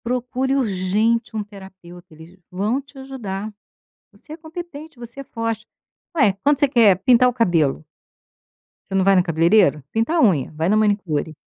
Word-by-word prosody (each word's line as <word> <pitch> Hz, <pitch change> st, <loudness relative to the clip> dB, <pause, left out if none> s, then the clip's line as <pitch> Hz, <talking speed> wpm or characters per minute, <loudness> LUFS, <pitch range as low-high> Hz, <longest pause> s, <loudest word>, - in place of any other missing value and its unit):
Procure 250 Hz, +2 st, -1 dB
urgente 220 Hz, 0 st, 0 dB
um 215 Hz, -, -2 dB
terapeuta. 190 Hz, -3 st, -14 dB
Eles 160 Hz, +4 st, -15 dB
vão 205 Hz, +8 st, -1 dB
te 280 Hz, 0 st, -20 dB
ajudar. 220 Hz, -6 st, -6 dB, 0.6 s
Você 310 Hz, -, -12 dB
é -, -, -9 dB
competente, 320 Hz, -3 st, -10 dB
você 240 Hz, +3 st, -10 dB
é -, -, -8 dB
forte. 230 Hz, -3 st, -4 dB, 0.5 s
Ué, 245 Hz, -10 st, +4 dB
quando 285 Hz, -1 st, +3 dB
você 285 Hz, -, +3 dB
quer 230 Hz, -8 st, +5 dB
pintar 250 Hz, 0 st, +5 dB
o -, -, 0 dB
cabelo? 170 Hz, -, +1 dB, 1.1 s
Você 195 Hz, -, -4 dB
não 190 Hz, -, +3 dB
vai 195 Hz, 0 st, +5 dB
no 180 Hz, -, +4 dB
cabeleireiro? 165 Hz, -2 st, +2 dB
Pintar 230 Hz, +10 st, 0 dB
a -, -, +3 dB
unha? 170 Hz, -, +2 dB
Vai 160 Hz, +2 st, -1 dB
na 215 Hz, -, +3 dB
manicure. 190 Hz, -8 st, -1 dB
215 Hz, 165 wpm, -21 LUFS, 185-255 Hz, 1.1 s, quer